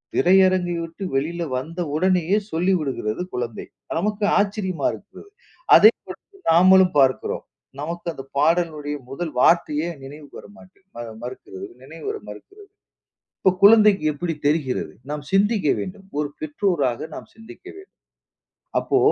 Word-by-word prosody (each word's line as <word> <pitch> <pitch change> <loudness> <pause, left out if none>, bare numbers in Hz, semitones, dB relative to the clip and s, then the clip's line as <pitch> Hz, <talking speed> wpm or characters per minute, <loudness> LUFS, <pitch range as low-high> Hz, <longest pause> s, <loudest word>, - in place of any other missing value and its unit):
திரையரங்கை 185 -1 +3
விட்டு 165 +4 -8
வெளியில 170 +5 -1
வந்த 165 +7 -6 0.2
உடனேயே 185 +2 +2
சொல்லிவிடுகிறது 160 - -1
குழந்தை. 120 -2 -4 0.3
நமக்கு 210 +2 -1
ஆச்சரியமா 200 -3 -1
இருக்கு. 205 - -12 0.5
அதே - - +8 0.2
படத்தை 395 -1 -12
நாமளும் 185 +1 +6
பார்க்கிறோம். 130 -1 +1 0.4
நமக்கு 170 +3 -5
அந்தப் 135 -2 -11
பாடலினுடைய 155 -2 0
முதல் 160 +3 -4
வார்த்தையே 155 +2 +3 0.2
நினைவுக்கு 145 +1 -11
வர - - -15
மாட்டு 190 -4 -19 0.4
மறுக்கிறது 385 - -8 0.2
நினைவுவர 420 +1 -6
மறுக்கிறது. 405 0 -13 0.7
இப்போ 190 - +4
குழந்தைக்கு 210 -5 +6
எப்படி 165 +3 -3
தெரிகிறது? 145 -4 -1 0.2
நாம் 150 -1 -4
சிந்திக்க 205 -3 +2
வேண்டும். 195 +1 -7
ஒரு 150 - -1
பெற்றோராக 150 - -1
நாம் - - -10
சிந்திக்க 225 +11 -14
வேண்டும். 390 +1 -15 0.8
அப்போ, - - 0
175 Hz, 120 wpm, -22 LUFS, 150-200 Hz, 0.8 s, அதே